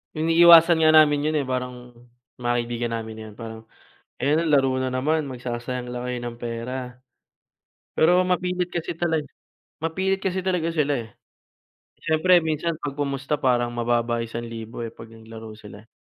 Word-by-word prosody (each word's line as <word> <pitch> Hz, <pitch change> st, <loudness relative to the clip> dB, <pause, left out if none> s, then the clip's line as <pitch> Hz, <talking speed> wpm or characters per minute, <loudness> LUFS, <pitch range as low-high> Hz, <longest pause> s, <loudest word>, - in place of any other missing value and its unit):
iniiwasan 165 Hz, +1 st, +7 dB
nga 155 Hz, 0 st, +5 dB
namin 150 Hz, -1 st, +5 dB
yun -, -, -2 dB
eh, -, -, -3 dB
parang 125 Hz, -1 st, -5 dB, 0.5 s
mga 120 Hz, 0 st, 0 dB
kaibigan 120 Hz, 0 st, -3 dB
namin 110 Hz, -1 st, -6 dB, 0.2 s
yun. -, -, -15 dB
Parang, 110 Hz, -1 st, -9 dB, 0.6 s
"Ayun, 155 Hz, +5 st, +2 dB
laro 135 Hz, -3 st, +3 dB
na 130 Hz, -, -1 dB
naman. 150 Hz, +3 st, 0 dB
Magsasayang 125 Hz, 0 st, -5 dB
lang 125 Hz, 0 st, -5 dB
kayo 125 Hz, -1 st, -3 dB
ng 120 Hz, -1 st, -6 dB
pera." 120 Hz, +2 st, -4 dB, 1.2 s
Pero 180 Hz, +3 st, +5 dB
mapilit 180 Hz, 0 st, -1 dB
kasi 170 Hz, -1 st, -3 dB
talag 160 Hz, -3 st, -1 dB, 0.6 s
mapilit 190 Hz, +4 st, -1 dB
kasi 190 Hz, -1 st, -1 dB
talaga 180 Hz, -3 st, 0 dB
sila 150 Hz, -3 st, +1 dB
eh. -, -, -20 dB, 0.9 s
Siyempre 165 Hz, +3 st, +3 dB
minsan 160 Hz, +1 st, -1 dB
'pag 145 Hz, -2 st, -4 dB
pumusta 140 Hz, +1 st, -2 dB
parang 120 Hz, -2 st, +1 dB
mababa 120 Hz, 0 st, 0 dB
1000 115 Hz, 0 st, -6 dB
eh 115 Hz, -, -8 dB
'pag 115 Hz, -, -12 dB
naglaro 110 Hz, -1 st, -11 dB
sila. 105 Hz, 0 st, -13 dB
130 Hz, 150 wpm, -24 LUFS, 120-160 Hz, 1.2 s, iniiwasan